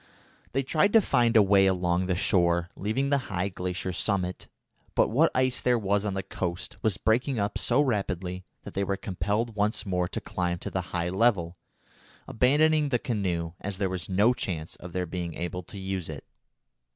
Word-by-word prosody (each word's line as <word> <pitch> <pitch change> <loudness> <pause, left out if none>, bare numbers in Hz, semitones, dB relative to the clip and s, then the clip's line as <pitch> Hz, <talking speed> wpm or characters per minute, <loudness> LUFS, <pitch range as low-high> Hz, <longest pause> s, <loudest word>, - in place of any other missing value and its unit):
They 135 +2 +1
tried 160 +9 +2
to 225 - +8
find 120 - +3
a 105 - +8
way 95 0 +5
along 90 -1 +1
the 90 - +1
shore, 85 -1 +2
leaving 130 +8 -1
the 140 - +4
high 95 0 -1
glacier 90 0 -3
summit, 90 0 -1 0.5
but - - +4
what 155 +8 +4
ice 130 0 +2
there 125 -1 +3
was 100 -1 0
on 100 -2 -2
the 95 - -2
coast 90 0 -4
was 105 -5 +1
breaking 125 +4 +1
up 100 -1 -1
so 125 +3 +3
rapidly 95 - -1 0.2
that - - -9
they 100 - 0
were 100 0 -1
compelled 105 +5 -2
once 105 +2 0
more 90 -2 0
to - - -4
climb 90 -1 -2
to - - -6
the 95 - -1
high 85 0 -1
level, 95 -4 +2 0.7
abandoning 150 +4 +3
the 125 - +2
canoe, 90 -9 -2
as 100 -1 -4
there 95 -1 0
was 95 0 -4
no 105 +6 +4
chance 80 -9 -4
of 90 -1 -10
their 90 -1 -1
being 85 -1 -5
able 90 +2 -4
to 95 +3 -12
use 95 -3 -4
it. 75 -3 -7
95 Hz, 190 wpm, -27 LUFS, 90-115 Hz, 0.7 s, to